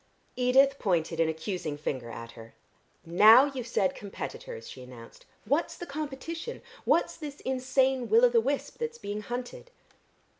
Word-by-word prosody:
Edith 270 Hz, +2 st, +4 dB
pointed 165 Hz, -5 st, 0 dB
an 165 Hz, -1 st, +3 dB
accusing 160 Hz, -2 st, -4 dB
finger 130 Hz, -5 st, -4 dB
at 115 Hz, 0 st, -8 dB
her. 115 Hz, -1 st, -13 dB, 0.5 s
"Now 215 Hz, +10 st, +8 dB
you've 265 Hz, -4 st, -5 dB
said 190 Hz, -5 st, +1 dB
competitors," 470 Hz, -, -7 dB
she 130 Hz, -, -10 dB
announced. 125 Hz, -2 st, -13 dB, 0.2 s
"What's 285 Hz, +9 st, 0 dB
the 350 Hz, -, -6 dB
competition? 310 Hz, -, -6 dB, 0.2 s
What's -, -, +2 dB
this 295 Hz, -3 st, -8 dB
insane 260 Hz, 0 st, +1 dB
will 460 Hz, +3 st, +6 dB
o' -, -, +5 dB
the 470 Hz, -1 st, +3 dB
wisp 285 Hz, -8 st, -3 dB
that's 465 Hz, 0 st, -3 dB
being 205 Hz, -, -5 dB
hunted?" 250 Hz, -, -6 dB
250 Hz, 150 wpm, -29 LUFS, -, 0.5 s, Now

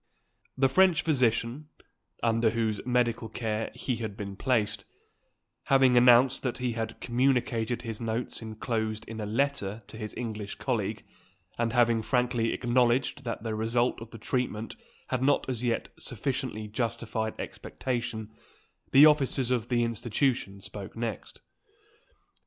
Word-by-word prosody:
The 135 Hz, 0 st, +4 dB
French 175 Hz, +2 st, +4 dB
physician, 125 Hz, -1 st, +1 dB, 0.6 s
under 115 Hz, 0 st, +3 dB
whose 110 Hz, -2 st, -1 dB
medical 120 Hz, -2 st, +1 dB
care 110 Hz, -1 st, -2 dB
he 125 Hz, -3 st, -2 dB
had 110 Hz, -3 st, -5 dB
been 100 Hz, -2 st, -5 dB
placed, 105 Hz, -3 st, 0 dB, 0.8 s
having 135 Hz, -2 st, +5 dB
announced 125 Hz, +1 st, +6 dB
that 125 Hz, -3 st, -2 dB
he 125 Hz, -1 st, -1 dB
had 115 Hz, -1 st, -4 dB
communicated 120 Hz, -2 st, +1 dB
his 115 Hz, -2 st, -5 dB
notes 115 Hz, +2 st, -3 dB
enclosed 110 Hz, -1 st, -3 dB
in 110 Hz, 0 st, -6 dB
a 105 Hz, -, -3 dB
letter 115 Hz, -3 st, -1 dB
to 110 Hz, -, -11 dB
his 110 Hz, -1 st, -6 dB
English 110 Hz, -4 st, -4 dB
colleague, -, -, -2 dB, 0.6 s
and 115 Hz, -1 st, +1 dB
having 120 Hz, -2 st, +4 dB
frankly 125 Hz, -1 st, +1 dB
acknowledged 125 Hz, +2 st, +1 dB
that 115 Hz, -2 st, -4 dB
the 110 Hz, -1 st, -2 dB
result 115 Hz, +2 st, 0 dB
of 115 Hz, -, -8 dB
the 115 Hz, -, -10 dB
treatment 115 Hz, -1 st, -2 dB, 0.3 s
had 130 Hz, -1 st, -1 dB
not 140 Hz, +2 st, +2 dB
as 125 Hz, -2 st, -2 dB
yet 120 Hz, -2 st, 0 dB
sufficiently 125 Hz, -3 st, -3 dB
justified 110 Hz, 0 st, -3 dB
expectation, 120 Hz, -4 st, -4 dB, 0.6 s
the 140 Hz, +3 st, +9 dB
officers 135 Hz, -4 st, +3 dB
of 120 Hz, -2 st, 0 dB
the 120 Hz, -1 st, +2 dB
institution 115 Hz, -2 st, -1 dB
spoke 100 Hz, 0 st, -8 dB
next. 115 Hz, -1 st, -5 dB
120 Hz, 135 wpm, -28 LUFS, 110-125 Hz, 0.8 s, the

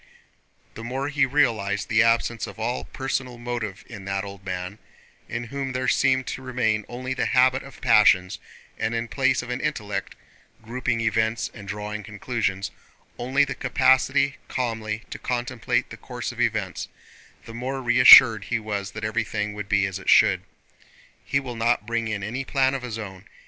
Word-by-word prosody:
The 115 Hz, -, -9 dB
more 135 Hz, +4 st, -3 dB
he 140 Hz, -2 st, +2 dB
realized 110 Hz, -7 st, +1 dB
the 115 Hz, 0 st, +3 dB
absence 115 Hz, -1 st, +1 dB
of -, -, -10 dB
all 65 Hz, -, -2 dB
personal 130 Hz, -2 st, -4 dB
motive 120 Hz, -5 st, -5 dB
in 105 Hz, -5 st, -10 dB
that 100 Hz, 0 st, -2 dB
old 100 Hz, -1 st, -9 dB
man—in 95 Hz, +5 st, -7 dB
whom 135 Hz, +2 st, -4 dB
there 130 Hz, 0 st, -2 dB
seemed 130 Hz, 0 st, +2 dB
to 130 Hz, -, -5 dB
remain 120 Hz, -5 st, -1 dB
only 130 Hz, +2 st, -4 dB
the -, -, -1 dB
habit 130 Hz, +1 st, +3 dB
of 135 Hz, -, -13 dB
passions, 105 Hz, -6 st, +4 dB, 0.4 s
and 115 Hz, -, -1 dB
in 115 Hz, 0 st, -2 dB
place 130 Hz, +4 st, +1 dB
of 125 Hz, -, -6 dB
an 125 Hz, -, -3 dB
intellect 105 Hz, -10 st, -3 dB, 0.5 s
(grouping 115 Hz, 0 st, -2 dB
events 110 Hz, 0 st, 0 dB
and 100 Hz, -3 st, -11 dB
drawing 105 Hz, +1 st, -5 dB
conclusions) 105 Hz, -2 st, -3 dB, 0.5 s
only 135 Hz, +4 st, +2 dB
the 135 Hz, -, -4 dB
capacity 130 Hz, +2 st, +2 dB
calmly 110 Hz, -3 st, -3 dB
to -, -, -6 dB
contemplate 120 Hz, -1 st, -2 dB
the -, -, -8 dB
course -, -, -6 dB
of -, -, -5 dB
events—the 115 Hz, -, -5 dB
more 130 Hz, +3 st, -4 dB
reassured 120 Hz, -3 st, +8 dB
he -, -, -1 dB
was 105 Hz, -3 st, -4 dB
that 105 Hz, -, -7 dB
everything 110 Hz, -1 st, -2 dB
would 105 Hz, -1 st, -7 dB
be 100 Hz, -1 st, +3 dB
as 95 Hz, 0 st, -4 dB
it -, -, -4 dB
should. -, -, +5 dB, 0.8 s
"He 140 Hz, -, 0 dB
will 130 Hz, -3 st, -6 dB
not 115 Hz, -2 st, +1 dB
bring 115 Hz, 0 st, -1 dB
in 105 Hz, -2 st, -3 dB
any 120 Hz, +7 st, -3 dB
plan 135 Hz, -1 st, +1 dB
of 135 Hz, -, -3 dB
his 120 Hz, -3 st, -5 dB
own. 95 Hz, -3 st, -8 dB
115 Hz, 170 wpm, -24 LUFS, 105-130 Hz, 0.8 s, reassured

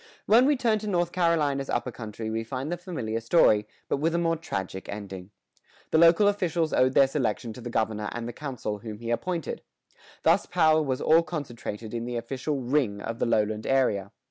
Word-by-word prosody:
When 240 Hz, +5 st, +5 dB
we 295 Hz, -, +4 dB
turn 230 Hz, -4 st, +2 dB
to 210 Hz, -, -6 dB
North 175 Hz, -3 st, 0 dB
Carolina's 150 Hz, -6 st, +1 dB
upper 125 Hz, -, -1 dB
country 110 Hz, -1 st, -6 dB
we 115 Hz, 0 st, -2 dB
find 130 Hz, +6 st, -4 dB
the -, -, 0 dB
familiar 130 Hz, -, -4 dB
story, 110 Hz, -5 st, +4 dB, 0.2 s
but -, -, 0 dB
with 160 Hz, +4 st, 0 dB
a -, -, +2 dB
more 165 Hz, -1 st, +1 dB
tragic 95 Hz, -, -5 dB
ending. 95 Hz, -2 st, -7 dB, 0.6 s
The 160 Hz, -, +4 dB
local 170 Hz, +5 st, +6 dB
officials 175 Hz, -5 st, 0 dB
owed 130 Hz, +1 st, +3 dB
their 135 Hz, -, +7 dB
selection 120 Hz, -4 st, -2 dB
to 125 Hz, -, -10 dB
the 120 Hz, -, -6 dB
governor 110 Hz, -2 st, -1 dB
and 120 Hz, 0 st, -5 dB
the 120 Hz, -, -5 dB
council 120 Hz, -7 st, -5 dB
whom 110 Hz, -1 st, -7 dB
he 115 Hz, +1 st, -5 dB
appointed. 165 Hz, +7 st, -2 dB, 0.6 s
Thus -, -, +3 dB
power 160 Hz, -3 st, +4 dB
was 130 Hz, -4 st, -2 dB
all 160 Hz, +1 st, +5 dB
concentrated 120 Hz, -9 st, -6 dB
in 115 Hz, 0 st, -3 dB
the 120 Hz, 0 st, -3 dB
official 135 Hz, +4 st, -3 dB
"ring" 120 Hz, -6 st, 0 dB
of 115 Hz, +2 st, -5 dB
the -, -, +1 dB
lowland 110 Hz, -1 st, 0 dB
area. 105 Hz, -8 st, +1 dB
130 Hz, 195 wpm, -27 LUFS, 110-165 Hz, 0.6 s, their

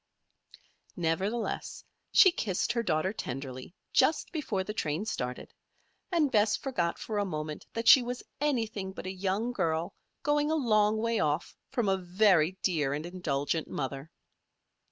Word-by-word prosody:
Nevertheless 185 Hz, +7 st, -2 dB, 0.3 s
she 375 Hz, -, +8 dB
kissed 195 Hz, -, -1 dB
her 235 Hz, -, 0 dB
daughter 180 Hz, -1 st, 0 dB
tenderly, 130 Hz, -, -6 dB, 0.2 s
just 285 Hz, +4 st, +3 dB
before 250 Hz, -, -2 dB
the 210 Hz, -, -5 dB
train 155 Hz, 0 st, -2 dB
started, 125 Hz, -, -4 dB, 0.6 s
and 315 Hz, -6 st, +2 dB
Bess 210 Hz, 0 st, +3 dB
forgot 175 Hz, -11 st, -1 dB
for 215 Hz, -2 st, -3 dB
a -, -, +2 dB
moment 155 Hz, -5 st, -5 dB
that 230 Hz, 0 st, -3 dB
she 265 Hz, -, +10 dB
was 245 Hz, +1 st, -5 dB, 0.2 s
anything 225 Hz, -9 st, -1 dB
but -, -, -8 dB
a 185 Hz, -, -3 dB
young 195 Hz, +5 st, -1 dB
girl 165 Hz, -7 st, -1 dB, 0.3 s
going 295 Hz, 0 st, +2 dB
a 315 Hz, -, +2 dB
long 215 Hz, -6 st, +3 dB
way 230 Hz, +1 st, 0 dB
off 150 Hz, +1 st, -1 dB
from 240 Hz, -4 st, 0 dB
a 190 Hz, 0 st, +3 dB
very 185 Hz, -2 st, +3 dB
dear 150 Hz, -7 st, +1 dB
and 150 Hz, +2 st, -5 dB
indulgent 160 Hz, -3 st, -2 dB
mother. 135 Hz, +2 st, -4 dB
190 Hz, 150 wpm, -30 LUFS, 160-230 Hz, 0.6 s, she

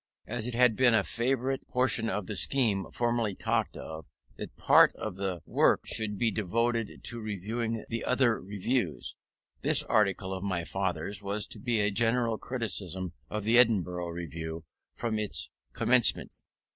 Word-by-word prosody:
As 115 Hz, 0 st, -3 dB
it 125 Hz, -, -4 dB
had 125 Hz, -2 st, +4 dB
been 120 Hz, -1 st, +4 dB
a 105 Hz, -, +3 dB
favourite 130 Hz, +3 st, -1 dB
portion 125 Hz, -2 st, +2 dB
of 105 Hz, -1 st, -3 dB
the 105 Hz, -, -4 dB
scheme 105 Hz, -6 st, +1 dB
formerly 120 Hz, -4 st, -1 dB
talked -, -, -1 dB
of, 80 Hz, -1 st, -8 dB, 0.3 s
that -, -, -8 dB
part -, -, +5 dB
of 105 Hz, -4 st, -6 dB
the 95 Hz, -3 st, -2 dB
work -, -, +2 dB
should 105 Hz, -2 st, -1 dB
be 115 Hz, +2 st, +1 dB
devoted 115 Hz, +3 st, -1 dB
to 120 Hz, -, -3 dB
reviewing 110 Hz, +2 st, -4 dB
the 115 Hz, 0 st, -4 dB
other 125 Hz, -3 st, +2 dB
Reviews, 100 Hz, -, -2 dB, 0.5 s
this -, -, +6 dB
article 95 Hz, -2 st, +1 dB
of 95 Hz, 0 st, -5 dB
my 95 Hz, -4 st, -1 dB
father's 95 Hz, +2 st, -3 dB
was 100 Hz, +1 st, -1 dB
to 110 Hz, -, -7 dB
be 115 Hz, +1 st, 0 dB
a 105 Hz, 0 st, +2 dB
general 115 Hz, +1 st, +1 dB
criticism 95 Hz, -7 st, -3 dB, 0.2 s
of 105 Hz, -1 st, -4 dB
the 115 Hz, +3 st, +4 dB
Edinburgh 90 Hz, -7 st, +2 dB
Review 80 Hz, -1 st, -6 dB, 0.3 s
from 115 Hz, -2 st, -2 dB
its 105 Hz, -1 st, +1 dB, 0.2 s
commencement. 125 Hz, -1 st, +3 dB
110 Hz, 160 wpm, -29 LUFS, 95-120 Hz, 0.5 s, this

